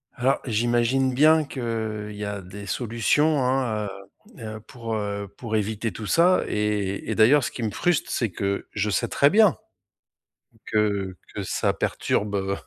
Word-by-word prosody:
Alors 130 +3 +1
j'imagine 120 +3 +1
bien 155 +3 +5
qu'il 110 -5 -4
y 105 - -4
a 100 -1 -4
des 100 +3 -10
solutions 130 +7 +1
hein, 125 -5 0 0.5
heu 115 - -8
heu, - - -10
pour, 115 0 -6
heu, 100 -1 -3
pour 110 -3 -4
éviter 110 +1 -1
tout 110 - -7
ça 175 - +4
et 105 -2 -1
et - - -1
d'ailleurs 125 +5 +5
ce - - -3
qui 120 - -5
me 110 - -1
frustre, 175 -3 0
c'est 115 -4 0
que 100 +2 -3
je 105 0 0
sais - - 0
très 140 - +4
bien 210 - +5 1.1
que 100 -3 0 0.2
que - - -3
ça - - 0
perturbe, 105 -1 -1
heu, 100 0 -1
110 Hz, 165 wpm, -24 LUFS, 105-130 Hz, 1.1 s, bien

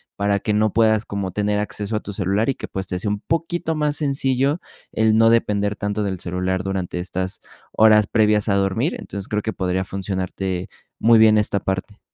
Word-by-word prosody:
para 100 0 +1
que 105 - -1
no 105 0 +2
puedas 110 -1 +3
como 100 -2 -4
tener 105 +2 0
acceso 105 +1 -3
a 105 - -1
tu 105 - -7
celular 100 +5 0
y 135 - 0
que, - - -7
pues, 95 -1 -5
te 90 - -3
sea 105 - -2
un 105 0 -2
poquito 165 0 -2
más 150 -1 0
sencillo 140 0 0 0.3
el 110 0 +2
no 115 0 +6
depender 105 -3 +1
tanto 105 +1 -2
del 95 -3 -3
celular 90 +1 -2
durante 95 -2 -3
estas 95 +1 -3 0.3
horas 110 -1 +5
previas 105 -1 +2
a 100 - +3
dormir. 95 -1 0
Entonces 100 0 -7
creo 105 0 0
que 110 +1 -3
podría 95 0 -1
funcionarte 95 -1 -3 0.3
muy 115 0 +5
bien 110 -1 +6
esta 105 -1 +1
parte. 95 +2 -4
105 Hz, 200 wpm, -21 LUFS, 95-110 Hz, 0.3 s, no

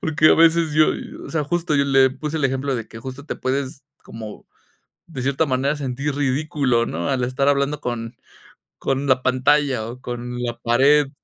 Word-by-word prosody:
porque 155 0 +3
a - - +7
veces 165 -1 +4
yo, 155 0 +5 0.4
o - - -9
sea, 160 -2 0
justo 170 0 -1
yo 140 - +3
le 135 -1 +4
puse 150 +4 -5
el 150 - -1
ejemplo 135 +1 0
de 115 -2 -5
que 115 - -10
justo 130 +3 -8
te - - -3
puedes 135 0 -3 0.2
como 110 -2 -9 0.6
de 150 -7 -6
cierta 140 +4 +1
manera 135 +2 0
sentir 140 +1 -3
ridículo, 135 -3 0
¿no?, 85 -4 -3
al 130 -2 0
estar 130 +3 0
hablando 145 +1 +1
con 120 -3 -5 0.6
con 135 +1 -1
la 130 -1 +2
pantalla 130 -2 +2
o 125 +2 -9
con 125 0 -5
la 120 -1 -3
pared. 135 +5 +4
135 Hz, 185 wpm, -21 LUFS, 125-150 Hz, 0.6 s, a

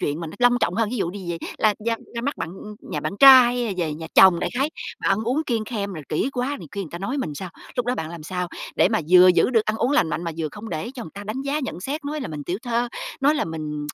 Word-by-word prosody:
chuyện 150 +3 -2
mà 165 - -4
nó 155 - -8
long 245 0 +4
trọng 175 - +1
hơn, 225 0 0
thí 250 - -3
dụ 175 -4 -1
đi 185 -3 -6
về 170 - -3 0.2
la 215 -1 +3
ra 230 - +2 0.2
ra 235 - -2
mắt 285 +3 -2
bạn, 160 - -4
ưm, 210 +4 -9
nhà - - -5
bạn - - -3
trai 265 -2 +10
hay 245 -1 -1
là 205 - -2
về 160 -4 -1
nhà 160 +1 -7
chồng 185 -3 +7
đại - - -1
khái, 285 +3 +1 0.3
mà - - 0
ăn 195 - +3
uống 265 +7 0
kiêng 225 -3 0
khem 205 -4 -4
rồi 155 -4 -8
kỹ 205 - 0
quá 260 +3 -2
nhiều - - -10
khi 200 - -4
người 160 - -9
ta 170 - -6
nói 250 +9 -3
mình 150 - -3
sao? 185 +3 -6 0.3
Lúc 245 -1 -1
đó 250 - +1
bạn 160 -8 -5
làm 170 -2 -8
sao 180 +1 -3 0.3
để - - +5
mà 220 +1 +1
vừa 185 0 +8
giữ 180 - +4
được 225 -4 +3
ăn 215 +1 -1
uống 250 - 0
lành 180 - +3
mạnh, 160 +3 -3
mà 165 - -2
vừa 155 -2 -1
không 215 +2 -8
để 175 +8 -4
cho 245 - -6
người 160 - -9
ta 200 +1 -8
đánh 230 +6 -4
giá 285 +2 -1
nhận 255 -9 -5
xét 285 +7 -4
nói 300 +1 -3
là - - -4
mình 150 -2 -6
tiểu 180 +6 -3
thư, 240 -1 0 0.3
nói 290 +3 +4
là - - 0
mình 150 -2 -5
205 Hz, 320 wpm, -23 LUFS, 170-245 Hz, 0.3 s, trai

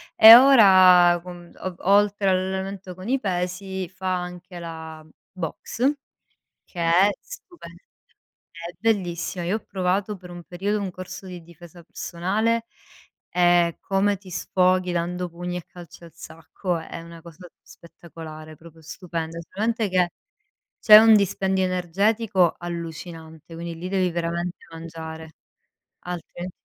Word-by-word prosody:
e 220 +1 +11
ora, 185 -9 +7
con 175 -1 -11
o 185 -1 -6 0.2
oltre 205 -1 +3
all'allenamento 190 0 -3
con 185 +3 -10
i 265 +2 +1
pesi, 185 -1 -3
fa 185 +1 -3
anche 180 0 -9
la 160 -2 -9 0.3
boxe, 230 - -3 0.7
che 175 - -9
è 170 +4 +4
stupe 375 -8 -13 0.8
è 170 +1 -9
bellissima. 180 -5 -2
Io 185 +5 0
ho - - -4
provato 195 +2 -2
per 180 -1 -13
un 175 0 -9
periodo 200 +4 -3
un 195 -2 -3
corso 185 +1 -9
di 180 -2 -9
difesa 170 +1 -15
personale, 210 +8 -2 0.7
e 175 -1 +3
come 200 +1 0
ti 190 -1 -15
sfoghi, 185 0 +1
dando 175 +1 -2
pugni 175 +1 -6
e 175 - -6
calci 175 -1 -14
al 165 - -14
sacco 165 +3 -5
è 165 +1 -8
una 170 0 -12
cosa 170 +2 -14
spettacolare, 155 -2 -12
proprio 165 +1 -16
stupenda. 165 0 -6
Solamente 220 +2 -1
che 180 -2 +1 0.7
c'è 210 -1 +9
un 220 0 +7
dispendio 190 -1 0
energetico 185 +1 +1
allucinante, 165 -1 -8
quindi 170 0 -6
lì 175 +3 -6
devi 185 -1 +1
veramente 170 +1 -3
mangiare, 160 -1 -9 0.7
altrimenti 175 +1 -7
180 Hz, 130 wpm, -23 LUFS, 170-195 Hz, 0.8 s, e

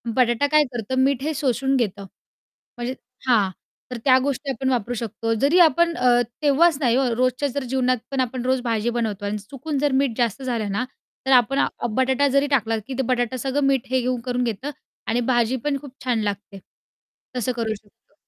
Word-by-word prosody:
बटाटा 245 +2 +3
काय 305 +1 +4
करतं 240 +2 -3
मीठ 270 -1 +1
हे 310 +2 -1
शोषून 270 0 0
घेतं. 205 -5 -1 0.7
म्हणजे 240 +1 -3 0.3
हां, 210 -6 +4 0.4
तर 250 - -3
त्या 260 -2 +7
गोष्टी 280 0 -2
आपण 265 +1 -2
वापरू 245 -2 0
शकतो. 225 0 -2
जरी 280 +10 +3
आपण 340 +1 +5
अ, 245 -1 +4 0.2
तेव्हाच 300 +2 +4
नाही 245 -5 +2
हो 270 - +2
रोजच्या 255 +3 +1
जर 280 +1 -3
जीवनात 255 0 +1
पण 270 - -2
आपण 250 0 -3
रोज 260 0 +1
भाजी 230 -1 0
बनवतो 210 -3 -2
आणि 205 +1 -2
चुकून 275 +8 -5
जर 290 0 +1
मीठ 260 -5 -1
जास्त 240 +2 0
झालं 230 -5 -2
ना, 205 +6 -1 0.4
तर 265 - +1
आपण 250 +3 +2
अ, - - +3 0.2
बटाटा 260 +4 +2
जरी 275 +1 +2
टाकला 225 -5 +1
की 270 - -5
ते - - +2
बटाटा 245 +1 -1
सगळं 270 +3 -1
मीठ 270 -3 +1
हे 260 0 +1
घेऊन 250 0 -1
करून 250 0 0
घेतं 240 +4 -3 0.4
आणि 230 +2 +1
भाजी 240 +1 +2
पण 285 -1 +1
खूप 280 -3 -11
छान 240 -3 +1
लागते. 200 -1 -4 0.8
तसं 250 0 0
करू 225 -2 -1
शकतो. 205 -1 -22
255 Hz, 195 wpm, -23 LUFS, 230-275 Hz, 0.8 s, त्या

